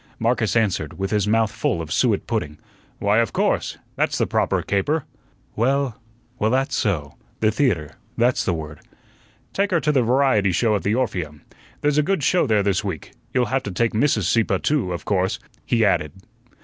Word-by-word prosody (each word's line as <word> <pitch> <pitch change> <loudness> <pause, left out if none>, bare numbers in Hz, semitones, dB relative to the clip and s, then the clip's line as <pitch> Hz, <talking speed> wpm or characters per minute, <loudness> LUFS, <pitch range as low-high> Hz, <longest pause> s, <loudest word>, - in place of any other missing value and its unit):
Marcus 115 -1 0
answered, 95 -9 0
with 95 0 -3
his 105 -1 +1
mouth 110 0 +2
full 105 -5 -1
of 80 -2 -4
suet - - +1
pudding: 75 +1 -3 0.4
"Why, 100 +2 +2
of 115 -3 0
course. - - 0 0.2
That's - - 0
the - - +2
proper - - 0
caper." 135 +10 0 0.5
"Well 130 0 0 0.4
well, 110 - +2
that's 135 +3 0
so. 80 - -1 0.2
The 110 -1 +3
theatre 85 - 0 0.2
that's 120 +2 +2
the 90 - 0
word." 75 -2 -7 0.7
"Take 200 +1 +1
her 175 -3 +2
to 150 - +2
the 135 -3 +3
variety 120 -5 +3
show 110 +3 +2
at 100 - -1
the 105 +3 0
Orpheum. 85 - -3 0.4
There's 145 0 +2
a - - +5
good 170 0 0
show 175 +1 +3
there 105 -3 +2
this 100 0 +1
week; 95 -6 -5 0.2
you'll 125 -1 +2
have 135 - +2
to 100 - -6
take 115 +5 +1
Mrs. 110 -2 +2
Sieppe, 100 +1 +2
too, 140 -11 +1
of 85 - -5
course," 95 -2 0 0.3
he 115 -2 +3
added. 75 -7 +1
110 Hz, 190 wpm, -22 LUFS, 95-130 Hz, 0.7 s, a